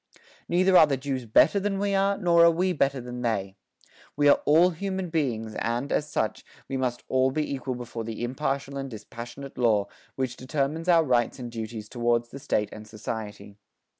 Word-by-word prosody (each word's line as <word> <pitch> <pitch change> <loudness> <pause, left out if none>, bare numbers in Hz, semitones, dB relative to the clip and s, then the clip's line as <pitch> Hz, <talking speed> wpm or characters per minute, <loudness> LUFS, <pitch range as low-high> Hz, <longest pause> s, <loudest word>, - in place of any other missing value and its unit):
Neither 185 +2 +3
are 155 - +8
the 140 -2 0
Jews 130 -2 -4
better 155 - +5
than 200 0 -1
we 200 0 0
are, 195 +1 +2
nor 170 -3 +4
are 170 - +8
we 180 +3 +1
better 140 -4 +1
than 125 0 -7
they. 100 -5 -1 0.6
We 145 0 +3
are - - +5
all 170 +5 +5
human 190 0 -4
beings 115 -9 -1
and, 120 +4 -2
as 150 - 0
such, 110 -7 -2 0.2
we 135 - -4
must 125 -2 -2
all 130 0 +2
be 150 +2 -2
equal 130 -1 -3
before 120 -2 -6
the 115 +1 -5
impartial 140 +2 -2
and 135 0 -5
dispassionate 120 +4 -9
Law, 105 -4 +2 0.3
which 130 -2 -3
determines 145 +5 -2
our 165 -2 +6
rights 125 -4 +1
and 120 -2 -7
duties 110 -2 -6
towards 120 0 0
the 140 - -9
State 105 -5 0
and 110 0 -10
society. 105 -1 -7
130 Hz, 190 wpm, -26 LUFS, 115-155 Hz, 0.6 s, are